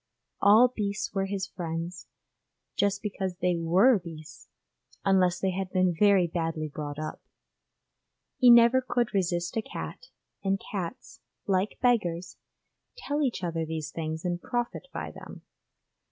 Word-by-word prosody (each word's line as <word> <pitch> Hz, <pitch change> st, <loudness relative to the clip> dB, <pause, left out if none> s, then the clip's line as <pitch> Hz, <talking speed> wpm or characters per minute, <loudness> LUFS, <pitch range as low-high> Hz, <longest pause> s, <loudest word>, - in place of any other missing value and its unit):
All 215 Hz, +5 st, +7 dB
beasts 210 Hz, -4 st, -3 dB
were 195 Hz, -1 st, 0 dB
his 195 Hz, -1 st, -2 dB
friends, 170 Hz, 0 st, -5 dB, 0.7 s
just 200 Hz, 0 st, +1 dB
because 190 Hz, -3 st, -3 dB
they 180 Hz, -1 st, 0 dB
were 185 Hz, +8 st, +4 dB
beasts, 160 Hz, -3 st, -11 dB, 0.6 s
unless 185 Hz, -2 st, +3 dB
they 190 Hz, -, 0 dB
had 190 Hz, 0 st, -3 dB
been 185 Hz, -2 st, +2 dB
very 195 Hz, +1 st, +4 dB
badly 165 Hz, -2 st, -2 dB
brought 145 Hz, -1 st, -6 dB
up. 155 Hz, 0 st, -5 dB, 1.2 s
He 250 Hz, -, +6 dB
never 235 Hz, +2 st, +7 dB
could 240 Hz, -2 st, -1 dB
resist 175 Hz, -2 st, 0 dB
a -, -, +2 dB
cat, -, -, -7 dB, 0.4 s
and 195 Hz, 0 st, +1 dB
cats, 200 Hz, +6 st, -6 dB, 0.3 s
like 195 Hz, +1 st, 0 dB
beggars, 180 Hz, -8 st, +1 dB, 0.6 s
tell 295 Hz, -10 st, -2 dB
each 255 Hz, -9 st, -1 dB
other 165 Hz, -2 st, -1 dB
these 160 Hz, -2 st, -4 dB
things 160 Hz, +1 st, -4 dB
and 175 Hz, 0 st, -1 dB
profit 240 Hz, -, -3 dB
by -, -, -5 dB
them. -, -, -11 dB
185 Hz, 140 wpm, -28 LUFS, 170-210 Hz, 1.2 s, All